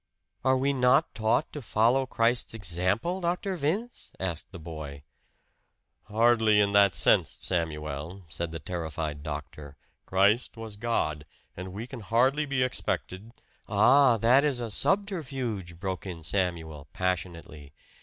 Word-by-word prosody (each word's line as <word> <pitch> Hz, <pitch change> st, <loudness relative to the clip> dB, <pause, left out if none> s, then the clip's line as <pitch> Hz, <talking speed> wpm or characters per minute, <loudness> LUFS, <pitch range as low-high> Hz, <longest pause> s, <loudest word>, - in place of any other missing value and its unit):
"Are 130 Hz, 0 st, +3 dB
we 140 Hz, +2 st, +1 dB
not 125 Hz, -1 st, +3 dB
taught 110 Hz, +7 st, 0 dB
to 150 Hz, -, -5 dB
follow 120 Hz, +4 st, +2 dB
Christ's 115 Hz, 0 st, +1 dB
example, 100 Hz, -, -1 dB
Dr. 180 Hz, +3 st, -1 dB
Vince?" 180 Hz, +10 st, -3 dB
asked 85 Hz, -3 st, -4 dB
the 95 Hz, -, -8 dB
boy. 80 Hz, -4 st, -8 dB, 1.0 s
"Hardly 110 Hz, 0 st, +3 dB
in 100 Hz, -1 st, +3 dB
that 100 Hz, -3 st, +5 dB
sense, -, -, +3 dB
Samuel," 80 Hz, +1 st, -3 dB
said 85 Hz, +1 st, -4 dB
the 80 Hz, -, -6 dB
terrified 80 Hz, -2 st, -4 dB
doctor. 75 Hz, -1 st, -7 dB, 0.3 s
"Christ 100 Hz, +6 st, +2 dB
was 110 Hz, -2 st, -7 dB
God. 105 Hz, -9 st, -1 dB, 0.3 s
And 95 Hz, +1 st, -7 dB
we 105 Hz, +5 st, -6 dB
can 125 Hz, 0 st, -9 dB
hardly 130 Hz, +7 st, +2 dB
be 135 Hz, -2 st, +1 dB
expected 110 Hz, -4 st, -3 dB, 0.2 s
" -, -, -39 dB
"Ah, 125 Hz, +4 st, +5 dB
that 120 Hz, +6 st, +4 dB
is 140 Hz, -4 st, 0 dB
a 115 Hz, -2 st, -4 dB
subterfuge!" 130 Hz, -, -2 dB
broke 95 Hz, 0 st, -4 dB
in 85 Hz, -3 st, -7 dB
Samuel, 80 Hz, -5 st, -2 dB
passionately. 85 Hz, -5 st, -4 dB
100 Hz, 135 wpm, -28 LUFS, 85-125 Hz, 1.0 s, that